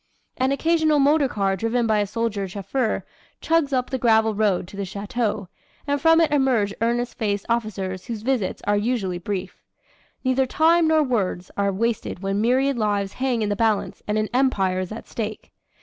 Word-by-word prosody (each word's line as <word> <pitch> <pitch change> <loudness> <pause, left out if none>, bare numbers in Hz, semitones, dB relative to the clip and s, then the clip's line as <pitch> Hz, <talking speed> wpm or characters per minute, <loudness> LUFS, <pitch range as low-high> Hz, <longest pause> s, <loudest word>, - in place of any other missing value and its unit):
"An 260 +1 +1
occasional 315 +1 +2
motorcar 275 -9 +2
driven 230 +4 0
by 215 -2 +2
a 205 - 0
soldier 210 -2 -2
chauffeur 215 +5 -2 0.3
chugs 325 -3 +1
up 255 -1 -1
the 260 - -1
gravel 220 -2 +3
road 200 -4 +1
to - - -11
the 200 - -3
chateau 205 +1 -3 0.4
and 285 -1 -1
from 325 +1 +5
it 325 -2 +3
emerge 255 -8 +2
earnest 240 +1 -1
faced 205 -3 -1
officers 200 -5 -2
whose 225 -3 -5
visits 245 -6 -1
are 205 - +2
usually 205 -5 -1
brief. 185 +1 -5 0.6
Neither 260 0 +2
time 325 +4 +3
nor 315 -1 +4
words 195 -8 -2
are 200 0 +1
wasted 215 -2 -2
when 195 +1 0
myriad 260 +3 +2
lives 205 -2 0
hang 250 -4 +1
in 210 - -1
the 205 - 0
balance 220 -1 0
and 210 +1 0
an 215 0 0
empire 200 -8 +2
is 185 +1 -4
at 220 - -8
stake. 215 -2 -5
225 Hz, 180 wpm, -23 LUFS, 200-260 Hz, 0.6 s, from